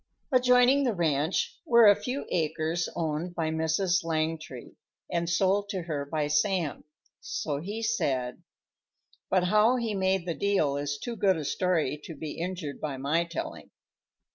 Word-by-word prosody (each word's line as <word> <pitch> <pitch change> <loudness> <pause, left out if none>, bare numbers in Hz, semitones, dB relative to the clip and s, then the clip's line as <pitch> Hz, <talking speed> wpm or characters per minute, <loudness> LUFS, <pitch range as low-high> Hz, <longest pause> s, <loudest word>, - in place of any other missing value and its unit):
Adjoining 250 +2 +5
the 240 -5 0
ranch 160 -1 0
were 235 -1 +6
a 205 -1 +8
few 255 +6 -4
acres 160 +1 -1
owned 165 +2 -2
by 165 -2 -1
"Mrs. 160 +3 +1
Langtry," 155 -5 -3 0.4
and 170 0 -1
sold 195 +3 +2
to 190 -4 -3
her 145 -4 -4
by 150 0 -1
Sam, 155 +2 0 0.3
so 145 -3 -3
he 205 +8 -5
said, 140 - -1 0.9
but 185 -1 +3
how 210 +6 +4
he 235 -3 -1
made 190 -2 +1
the 170 - -1
deal 190 -7 +1
is 145 0 -2
too 235 +10 -5
good 195 -4 +2
a 155 - -4
story 165 -4 0
to 165 - -8
be 150 +1 -6
injured 170 -5 -4
by 145 -3 -3
my 150 +6 +1
telling. 170 -1 -6
170 Hz, 155 wpm, -28 LUFS, 155-200 Hz, 0.9 s, a